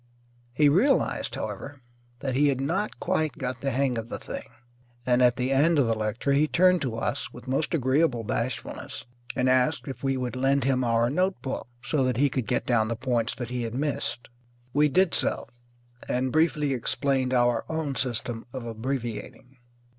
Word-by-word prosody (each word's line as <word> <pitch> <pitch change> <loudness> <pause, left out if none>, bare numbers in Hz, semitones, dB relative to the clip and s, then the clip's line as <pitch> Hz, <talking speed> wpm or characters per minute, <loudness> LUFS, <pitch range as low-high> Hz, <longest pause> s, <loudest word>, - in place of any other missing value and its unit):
He 145 +4 +4
realized, 205 - +2
however, 145 0 -6 0.4
that 135 -2 -2
he 145 +3 +4
had 135 -2 +1
not 180 +10 -1
quite 155 -6 0
got 125 -2 -4
the 140 - 0
hang 130 -2 +1
of 115 +1 -7
the - - -4
thing, - - -7 0.6
and 125 0 +3
at 125 -1 +5
the 130 +1 -1
end 150 +5 +4
of 140 - +4
the 115 - +2
lecture 110 +5 -1
he 150 +2 +3
turned 180 +5 +4
to 130 -6 -2
us 115 - -2
with - - -12
most 135 +6 0
agreeable 130 -3 +2
bashfulness 115 +3 -4 0.3
and 125 - +1
asked 130 +4 +2
if 135 - -7
we 135 -1 +1
would 125 0 -3
lend 135 +2 +2
him 130 -1 +2
our 115 0 +2
notebook, 180 -6 -1 0.2
so 145 -4 +1
that 130 -2 0
he 140 +1 +3
could 125 -5 -2
get 125 - 0
down 110 -3 +2
the 115 - -2
points 120 -1 -1
that 120 -2 -6
he 125 -1 -2
had 115 0 -4
missed. 140 -3 -2 0.5
We 150 +1 +4
did 185 +5 +3
so, - - 0 0.6
and 130 +1 0
briefly 150 -2 +2
explained 130 +1 0
our 120 -2 +3
own 160 -3 -2
system 120 -2 -2
of 130 -3 -5
abbreviating. 120 +2 -5
130 Hz, 185 wpm, -27 LUFS, 120-145 Hz, 0.6 s, at